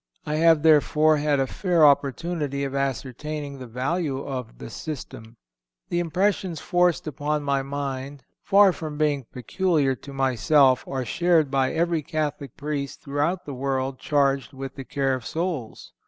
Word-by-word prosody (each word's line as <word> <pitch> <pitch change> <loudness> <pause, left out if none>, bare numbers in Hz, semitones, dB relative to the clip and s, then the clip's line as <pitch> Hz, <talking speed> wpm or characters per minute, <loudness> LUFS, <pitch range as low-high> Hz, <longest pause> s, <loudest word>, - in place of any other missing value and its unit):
I 150 0 -1
have, 160 -1 +4
therefore, 155 0 +4
had 145 -1 +1
a 135 - +2
fair 175 +2 +2
opportunity 140 +1 +1
of 135 -1 -3
ascertaining 140 +2 -3
the 130 - -8
value 135 +5 -2
of 125 - -6
the - - -9
"system." 120 -6 -8 0.5
The 175 - 0
impressions 180 0 0
forced 175 -1 +1
upon 150 0 -2
my 140 -1 +1
mind, 140 0 -5 0.2
far 200 -1 +5
from 155 -3 -6
being 145 -4 +1
peculiar 145 - 0
to 140 +2 -11
myself, 135 0 +3
are 130 -2 -3
shared 165 +1 +2
by 135 -2 +2
every 170 -1 +1
Catholic 150 -4 -4
Priest 145 -2 -4
throughout 150 +6 -1
the 145 - -6
world 130 0 -2
charged 140 -3 +1
with 135 0 -6
the 135 - -8
care 135 -1 0
of 130 -2 -3
souls. 160 -5 -4
145 Hz, 155 wpm, -24 LUFS, 135-155 Hz, 0.5 s, far